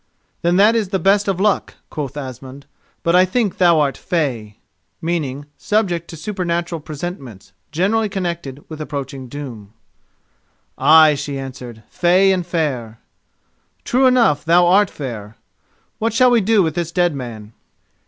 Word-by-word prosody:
"Then 175 +1 +2
that 210 +4 +5
is 215 -5 0
the 195 - 0
best 195 +3 +2
of 190 -2 -1
luck," 205 0 0 0.2
quoth 145 -3 -5
Asmund; 130 0 -8 0.4
"but 170 +1 +2
I 180 - +7
think 200 +2 0
that - - -28
thou 170 -3 +5
art 140 -2 0
fey."[*] 120 - -3 0.2
[*] 90 - -12
I.e. 145 -5 -2 0.2
subject 190 -6 0
to 165 - -9
supernatural 175 -3 -3
presentiments, 145 - -8 0.2
generally 205 +7 +1
connected 170 -8 -5
with 155 -1 -8
approaching 140 -3 -6
doom. 120 -7 -9 1.0
"Ay," 155 -1 +6
she 140 -1 -4
answered, 125 -4 -8
"fey 185 +2 +3
and 180 -2 -1
fair." 130 -10 -2 0.9
"True 260 +2 +3
enough 235 - +3
thou 175 +2 +4
art 195 +2 +4
fair. 110 -6 -7 0.6
What 225 0 -1
shall 250 +2 +4
we 235 -2 +4
do 210 0 +3
with 160 -2 -1
this 170 0 -3
dead 175 -2 +1
man?" 115 -5 -8
165 Hz, 155 wpm, -19 LUFS, 135-190 Hz, 1.0 s, I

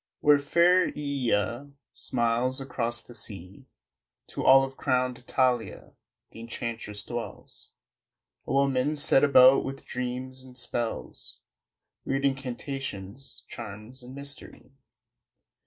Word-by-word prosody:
Where 145 -1 +5
fair 175 +5 +4
Ææia 140 -2 -1 0.2
smiles 120 +1 +1
across 120 -3 -2
the 120 - -13
sea 100 -4 -2 0.6
To - - -4
olive 135 0 +5
crowned 125 -2 0
Italia, 125 -1 -1 0.4
th' - - -14
enchantress 115 -2 -5
dwells 120 -1 -7 0.8
A - - -3
woman 135 +1 +2
set 145 -2 +5
about 135 -2 +7
with 135 0 -6
dreams 125 +1 -5
and 125 -1 -14
spells, 120 -2 -3 0.6
Weird 135 +1 -1
incantations, 135 -4 -4
charms 115 +3 -8
and 125 +2 -11
mystery. 140 -2 -7
130 Hz, 105 wpm, -27 LUFS, 120-135 Hz, 0.8 s, about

